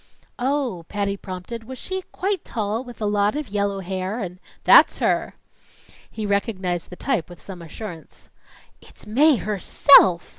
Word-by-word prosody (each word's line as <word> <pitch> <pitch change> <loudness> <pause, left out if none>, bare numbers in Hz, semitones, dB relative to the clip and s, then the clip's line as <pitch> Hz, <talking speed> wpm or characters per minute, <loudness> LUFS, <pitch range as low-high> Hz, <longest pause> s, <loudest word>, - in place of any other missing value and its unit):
"Oh," 255 -8 -1
Patty 200 -1 -2
prompted, 195 +4 -8
"was 260 +2 -8
she 375 +6 -4
quite 390 0 -2
tall 220 +1 -3
with 245 -3 -12
a - - 0
lot 205 +1 +1
of 300 -2 -4
yellow 200 -1 -1
hair 190 +3 -4
and 180 -5 -6
" - - -30
"That's - - +7
her!" - - 0 0.7
He 215 - -5
recognized 190 -4 -2
the 180 - -9
type 235 -6 -2
with 175 - -12
some 185 -3 -10
assurance. 170 0 -10 0.5
"It's - - -17
Mae 280 +8 +4
herself!" 200 -3 +5
205 Hz, 155 wpm, -22 LUFS, 185-245 Hz, 0.7 s, That's